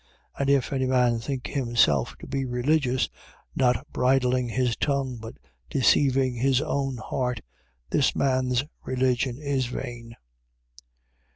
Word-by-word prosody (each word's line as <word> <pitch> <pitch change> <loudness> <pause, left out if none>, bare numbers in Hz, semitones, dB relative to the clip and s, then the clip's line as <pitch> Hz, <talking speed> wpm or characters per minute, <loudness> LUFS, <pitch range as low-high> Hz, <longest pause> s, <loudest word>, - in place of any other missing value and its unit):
1:26. - - -17
And 140 - +1
if 140 -1 +2
any 130 -1 0
man 125 -2 +2
think 130 +2 -4
himself 115 - +1
to - - -11
be 135 0 -2
religious, 130 +1 +1 0.5
not 125 -1 +2
bridling 125 -1 +2
his 125 0 0
tongue 135 -3 -1
but 115 0 -9 0.3
deceiving 135 -1 +3
his 130 +2 +2
own 140 -3 -2
heart, 125 +1 -2 0.5
this 145 - +2
man's 130 -1 +1 0.2
religion 130 -1 0
is 140 -3 -1
vain. 120 -2 -7
130 Hz, 125 wpm, -26 LUFS, 125-135 Hz, 0.5 s, deceiving